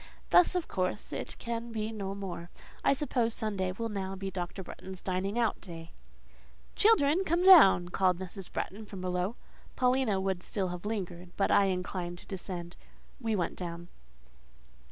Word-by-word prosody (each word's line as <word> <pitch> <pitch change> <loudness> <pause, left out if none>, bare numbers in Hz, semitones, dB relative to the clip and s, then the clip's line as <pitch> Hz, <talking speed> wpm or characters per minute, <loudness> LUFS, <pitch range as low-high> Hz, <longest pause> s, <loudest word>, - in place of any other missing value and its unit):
Thus, 360 +1 +6
of 355 -2 0
course, 185 +2 -2
it - - -5
can 235 0 -4
be 220 -1 -2
no 200 -3 -4
more. 180 -3 -6 0.3
I - - +5
suppose 250 -5 0
Sunday 195 -4 -1
will 230 +5 -3
now 195 -3 -3
be 195 0 -5
Dr. 180 +1 -4
Bretton's 190 +1 -9
dining 190 +4 -2
out 235 -2 +1
day….?" 165 -3 -9 0.8
"Children, 360 -5 +5
come 345 0 +1
down!" 330 - +9
here 175 - -9
called 185 -2 +2
Mrs. 190 +1 -7
Bretton 210 +2 -4
from 195 -3 -8
below. 180 +4 -1 0.4
Paulina 250 -5 +2
would 190 -2 -1
still 195 -3 -2
have 180 +3 -5
lingered, 180 -5 -4
but 195 - +2
I 200 - +6
inclined 180 -1 -2
to - - -14
descend: 175 -2 -6 0.4
we 225 -4 0
went 175 -4 -1
down. 175 -1 -6
195 Hz, 165 wpm, -31 LUFS, 180-225 Hz, 0.8 s, down